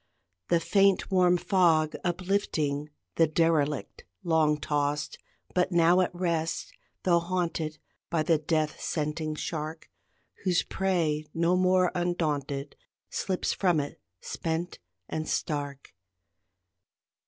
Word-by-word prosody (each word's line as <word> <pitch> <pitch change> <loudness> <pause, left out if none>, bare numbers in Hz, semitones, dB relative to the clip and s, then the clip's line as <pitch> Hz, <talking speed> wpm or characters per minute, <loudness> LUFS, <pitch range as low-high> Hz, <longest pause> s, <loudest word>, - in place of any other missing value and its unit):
The 170 - +3
faint 195 +3 +3
warm 180 -1 +4
fog 165 -5 +3
unlifting, 175 -5 -1 0.3
The 165 - +5
derelict 150 -6 0 0.2
long 155 -3 +2
tossed, 145 -1 -1 0.3
But 180 +1 +1
now 170 +1 +5
at 180 - +1
rest 170 -3 -2 0.3
tho 175 -2 +4
haunted 170 -3 -2 0.3
By 165 -2 +1
the 160 0 +3
death 155 0 -1
scenting 155 0 -2
shark, 155 +1 -5 0.5
Whose 180 -3 +2
prey 165 -6 0
no 170 +2 +3
more 185 0 +3
undaunted 150 -5 -2 0.4
Slips 185 -2 -1
from 175 -5 +2
it, 145 0 -5 0.2
spent 165 +2 -3 0.3
and 155 0 -3
stark. 145 -2 -3
165 Hz, 110 wpm, -28 LUFS, 150-180 Hz, 0.5 s, The